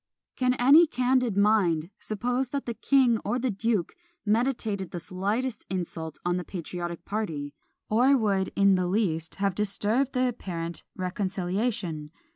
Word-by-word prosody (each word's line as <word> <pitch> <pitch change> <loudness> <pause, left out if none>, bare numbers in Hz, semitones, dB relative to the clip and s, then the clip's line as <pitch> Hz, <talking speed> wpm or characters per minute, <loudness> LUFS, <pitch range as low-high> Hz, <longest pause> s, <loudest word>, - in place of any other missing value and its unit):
Can 250 0 +2
any 285 +7 +7
candid 250 -5 +1
mind 195 -5 +3
suppose 245 +4 -1
that 280 +1 -3
the 235 - -2
king 250 -2 +3
or 245 - 0
the 255 -1 0
duke 205 -2 -1 0.3
meditated 215 -4 0
the 175 - -5
slightest 205 +8 -2
insult 170 -4 -4
on 175 0 +1
the 180 - -3
patriotic 175 -1 -6
party, 160 -9 -3 0.3
or 255 +6 +4
would 200 -5 +1
in 200 0 +5
the 180 -1 +1
least 175 -5 0
have 195 -1 0
disturbed 210 +6 0
the 255 -1 +2
apparent 170 -8 -4
reconciliation! 185 -3 -2
205 Hz, 140 wpm, -27 LUFS, 180-245 Hz, 0.3 s, any